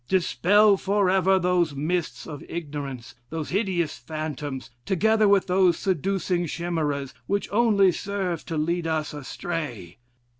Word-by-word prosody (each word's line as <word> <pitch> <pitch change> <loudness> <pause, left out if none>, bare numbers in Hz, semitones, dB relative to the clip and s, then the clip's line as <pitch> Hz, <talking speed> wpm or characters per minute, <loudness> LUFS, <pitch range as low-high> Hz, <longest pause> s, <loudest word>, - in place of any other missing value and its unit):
Dispel 200 +3 +4
forever 190 -1 +3
those 175 -4 +1
mists 160 +4 -2
of 145 -3 -8
ignorance, 145 -7 -6 0.2
those 160 -1 -4
hideous 180 -5 -1
phantoms, 150 -4 -5
together 215 - +3
with 200 -1 +4
those 180 -2 +3
seducing 185 -1 0
chimeras, 150 -5 -2
which 200 0 0
only 205 -3 +4
serve 185 -2 -3
to 165 - -3
lead 170 +2 0
us 155 -2 -1
astray. 135 - -5
175 Hz, 120 wpm, -25 LUFS, 150-190 Hz, 0.2 s, Dispel